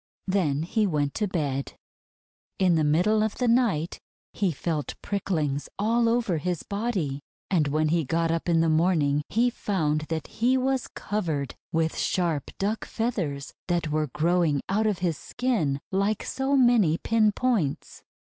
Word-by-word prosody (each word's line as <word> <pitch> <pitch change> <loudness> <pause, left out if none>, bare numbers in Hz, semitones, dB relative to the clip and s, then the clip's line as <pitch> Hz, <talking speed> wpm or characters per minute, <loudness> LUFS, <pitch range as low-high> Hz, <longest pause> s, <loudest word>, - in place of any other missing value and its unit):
Then 160 -7 +1
he 210 +5 +1
went 145 -5 0
to 210 - -1
bed. 145 -7 -2 0.8
In 185 -2 +3
the 160 -2 +2
middle 180 +9 +3
of 220 -1 -1
the 250 - 0
night 230 -10 +1 0.3
he 195 -3 +1
felt 155 0 -3
pricklings 160 -8 -1
all 230 +3 +2
over 230 -8 +1
his 175 +1 -2
body, 200 - -2 0.3
and 160 -6 +3
when 155 +2 +1
he 165 +1 +2
got 165 +3 0
up 165 +1 -1
in 165 -1 +4
the 165 - +2
morn 165 0 +3
ing 145 +1 +1
he 240 +3 +2
found 155 -9 -1
that 160 -2 -2
he 250 +3 +1
was 260 0 0
covered 160 - -3 0.2
with 160 0 0
sharp 165 -6 0
duck 210 +3 -1
feathers 175 - -3
that 175 -3 0
were 155 0 +1
growing 165 -2 +1
out 215 +3 +1
of 205 -3 0
his 165 -4 -1
skin 180 - -1
like 200 +2 0
so 270 +1 0
many 235 -11 +4
pin 220 +1 +2
points. 210 - -1
175 Hz, 160 wpm, -26 LUFS, 155-215 Hz, 0.8 s, in